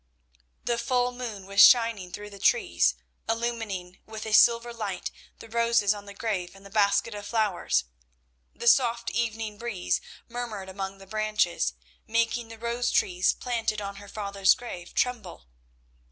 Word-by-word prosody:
The 235 -1 0
full 245 +1 +1
moon 235 -6 -6
was 200 +1 +4
shining 230 -7 +6
through 210 +2 -8
the 200 - -11
trees, 405 - +3 0.3
illumining 225 -6 -3
with 220 0 -7
a 220 - -3
silver 235 +1 +5
light 205 -5 -4 0.3
the - - -12
roses 230 -2 +2
on 205 -1 -9
the 200 - -10
grave 195 -5 -3
and 195 0 -16
the 195 - -12
basket 210 +2 +2
of 205 0 -7
flowers. 205 - +1 0.7
The 235 - -5
soft 235 -2 +4
evening 220 -1 -2
breeze 230 -6 -1 0.3
murmured 230 -5 -5
among 195 0 -5
the 195 - -13
branches, 210 - 0 0.3
making 230 +1 0
the 225 0 -10
rose 235 +2 -1
trees 180 0 +2
planted 230 -3 -2
on 200 -1 -6
her 205 0 -11
father's 200 -2 +2
grave 180 -8 -9
tremble. 225 - -2
215 Hz, 155 wpm, -27 LUFS, 200-235 Hz, 0.7 s, shining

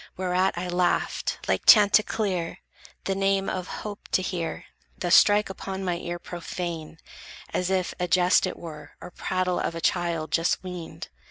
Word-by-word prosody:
Whereat 185 0 +1
I 180 +1 -3
laughed 180 0 0
Like - - 0
chanticleer, 205 -4 +4 0.5
the 195 - -1
name 195 0 +1
of 185 -1 -3
hope 210 -1 -7
to 185 - +3
hear 170 -3 -3 0.3
Thus 175 -1 0
strike 205 +1 +6
upon 190 0 -5
my 175 -1 0
ear 175 0 -4
profane, 170 -2 -6 0.6
as 180 0 0
if 185 -1 0
A 180 - 0
jest 180 0 +4
it - - -5
were, 150 -3 -10
or 180 - -10
prattle 185 0 -1
of 165 - -2
a - - -3
child 165 -3 0
Just 165 +3 +1
weaned. 180 -3 -7
180 Hz, 160 wpm, -26 LUFS, 170-190 Hz, 0.6 s, strike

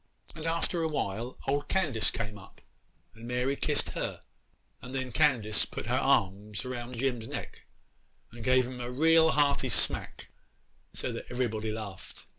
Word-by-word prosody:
'And, 160 0 -5
after 170 +1 0
a 160 - +2
while, 120 -5 -2
old 145 +2 +1
Candace 150 - +2
came 110 -2 -3
up, 100 -2 -14 0.5
and 115 +1 -10
Mary 125 +3 +1
kissed - - 0
her; - - -4 0.6
and 125 +2 -7
then 130 -1 -2
Candace 120 -7 +3
put - - -5
her - - -1
arms 100 +3 +1
round 125 -1 -5
Jim's 120 -3 0
neck - - -7 0.6
and 115 0 -9
gave 130 +1 +4
him 125 0 -6
a 120 - -3
real 160 +5 +5
hearty 145 -2 +3
smack, - - 0 0.6
so - - -4
that - - -6
everybody 110 -3 -1
laughed. 105 -4 -7
125 Hz, 155 wpm, -30 LUFS, 110-140 Hz, 0.6 s, real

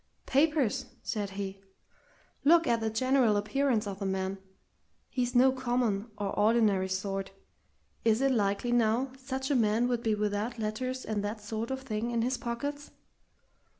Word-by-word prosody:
"Papers!" 275 -3 +2 0.2
said 205 -3 -2
he. 195 -1 -5 0.8
"Look 335 +3 +6
at 235 -4 +2
the 225 0 -1
general 245 -1 +3
appearance 220 +2 +1
of 200 -1 -5
the 200 - -3
man! 190 0 -2 0.7
He's 250 -1 -1
no 260 +2 +6
common 240 -5 0
or 205 -1 -2
ordinary 205 -3 +2
sort. 195 +1 -2 0.7
Is 225 0 +3
it 270 0 +3
likely, 205 0 +1
now, 240 +2 +2
such 265 +1 -3
a - - +3
man 225 0 +3
would 240 -2 0
be 220 -2 +1
without 210 +3 -1
letters 255 +4 -3
and 210 -2 -2
that 210 +2 -3
sort 220 +2 -4
of 265 0 -3
thing 225 -2 -2
in 235 -1 0
his 255 +2 0
pockets? 285 +5 -4
230 Hz, 155 wpm, -30 LUFS, 205-255 Hz, 0.8 s, Look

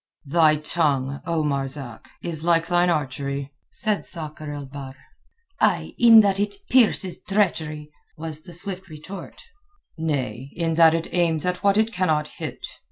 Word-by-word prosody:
"Thy 155 +1 +4
tongue, 145 -3 0
O 165 -2 0
Marzak, 135 -4 -4
is 160 -2 -1
like 165 -1 +3
thine 175 +1 +2
archery," 140 -2 -2 0.2
said 215 -3 -1
Sakr 155 -2 -7
el 145 -1 -6
Bahr. 135 -1 -9 0.6
"Ay—in 230 -2 +5
that 200 -2 +1
it 205 - 0 0.2
pierces 215 -7 +3
treachery," 160 -7 -1 0.3
was 155 -1 -4
the 175 +1 -11
swift 190 +1 -3
retort. 155 +6 -10 0.6
"Nay—in 140 +2 -2
that 165 0 +6
it 165 - -4
aims 165 -3 +1
at 180 0 -1
what 200 0 +4
it 220 +1 +2
cannot 155 -6 +1
hit. - - -7
160 Hz, 140 wpm, -23 LUFS, 145-180 Hz, 0.6 s, that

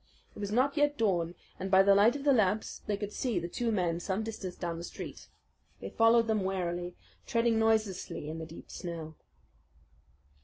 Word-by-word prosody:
It - - -10
was 205 -1 -3
not 265 +6 +2
yet 290 0 +2
dawn, 175 -6 +1 0.2
and 190 - -3
by 190 0 +6
the 200 0 +6
light 210 +6 +5
of 285 - -5
the 285 -1 +5
lamps 215 -2 +1
they 205 -1 0
could 205 0 -5
see 240 -7 -1
the 170 0 -1
two 230 +6 -1
men 175 -5 0
some 190 +4 -2
distance 210 -5 -5
down 170 -2 -4
the - - -6
street. - - -8 0.5
They - - -7
followed 230 0 +5
them 220 -3 +1
warily, 180 -2 -2 0.3
treading 230 -1 +2
noiselessly 215 -8 0
in 160 +1 -5
the 160 - -6
deep 165 - -12
snow. 165 -3 -6
200 Hz, 190 wpm, -31 LUFS, 175-225 Hz, 0.5 s, by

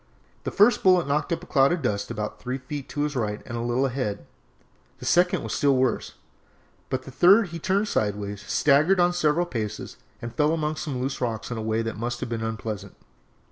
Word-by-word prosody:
The - - -2
first 210 +4 +4
bullet 185 -4 +4
knocked 150 +5 0
up 170 +1 -1
a - - -8
cloud 135 -5 +3
of 175 -4 -1
dust 100 -4 -1
about 105 -2 -4
three 125 +1 -3
feet 140 +1 -7
to 145 - -3
his 150 -1 -2
right 105 -4 -1
and 120 - -6
a 115 - -2
little 120 +3 +1
ahead, 120 - -3 0.7
the - - -9
second 180 +1 +3
was - - -4
still 140 -2 +3
worse, 130 -2 0 0.7
but 130 - -1
at - - -20
the 135 - -9
third 190 - +5
he 165 +1 -6
turned 195 +5 +1
sideways, 105 - -2
staggered 150 - +3
on 175 0 +4
several 170 0 +2
paces, 110 -9 -5 0.2
and 120 0 -7
fell 150 +1 +2
among 155 -1 -2
some 145 -5 -3
loose 135 +2 -3
rocks 115 -1 -3
in 120 - -3
a - - -3
way 110 +1 0
that 115 -1 -4
must 120 +1 -3
have - - -4
been 115 -1 -3
unpleasant. 110 -2 -5
130 Hz, 220 wpm, -25 LUFS, 115-160 Hz, 0.7 s, third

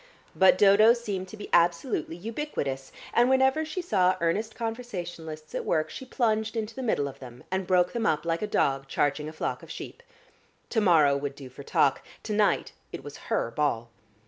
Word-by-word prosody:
But 190 -1 +6
Dodo 205 +3 +7
seemed 205 -6 -4
to 215 - -10
be 205 - -7
absolutely 170 - +2
ubiquitous, 175 - -4 0.2
and 240 +1 +4
whenever 265 +3 +3
she 315 +4 -4
saw 185 - +2
earnest 205 +7 -1
conversationalists 175 -10 -6
at - - -2
work, 155 -1 0
she 260 - -7
plunged 220 -3 0
into 220 0 -3
the 265 - -6
middle 215 - 0
of 135 - -9
them, 125 -2 -11
and 190 -1 -1
broke 180 -1 +3
them 230 -2 0
up 155 +1 0
like 165 0 -1
a 210 - -1
dog 135 -8 +1
charging 145 +2 0
a - - -10
flock - - -3
of - - -13
sheep. - - -8 0.7
To 225 - +2
morrow 160 -8 +5
would 140 0 -3
do 135 -2 -10
for 135 - -11
talk, 140 0 +2 0.2
to 215 - -3
night 210 -1 +2 0.2
it - - -7
was - - -9
her 115 - 0
ball. 120 -6 -1
185 Hz, 195 wpm, -27 LUFS, 150-225 Hz, 0.7 s, Dodo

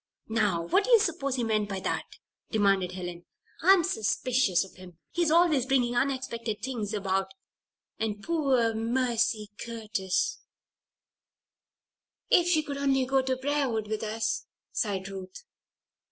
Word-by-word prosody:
"Now, 210 -7 +1
what 395 - +2
do - - -4
you 470 -2 +8
suppose 310 -9 -1
he 245 - -1
meant 215 -2 0
by 195 -1 -3
that?" - - -2 0.4
demanded 195 -4 +2
Helen. 175 -1 -7 0.3
"I'm 375 0 +6
suspicious 220 - +1
of 190 - -16
him. 180 -3 -13
He's 345 -2 +1
always 315 -6 +4
bringing 245 -3 +2
unexpected 240 -4 -2
things 235 -6 -3
about. 195 -1 -1 0.7
And 210 -2 -2
poor 270 -9 +2
Mercy 230 -2 0
Curtis 215 -5 -2 0.9
" - - -60
"If 350 -1 +5
she 315 -3 +3
could 285 -2 -5
only 270 -2 +2
go 270 +1 +2
to 260 0 0
Briarwood 260 -5 -1
with 215 0 -3
us," 220 +1 -2 0.2
sighed 195 -4 -1
Ruth. 195 - -8
230 Hz, 140 wpm, -28 LUFS, 205-270 Hz, 0.9 s, you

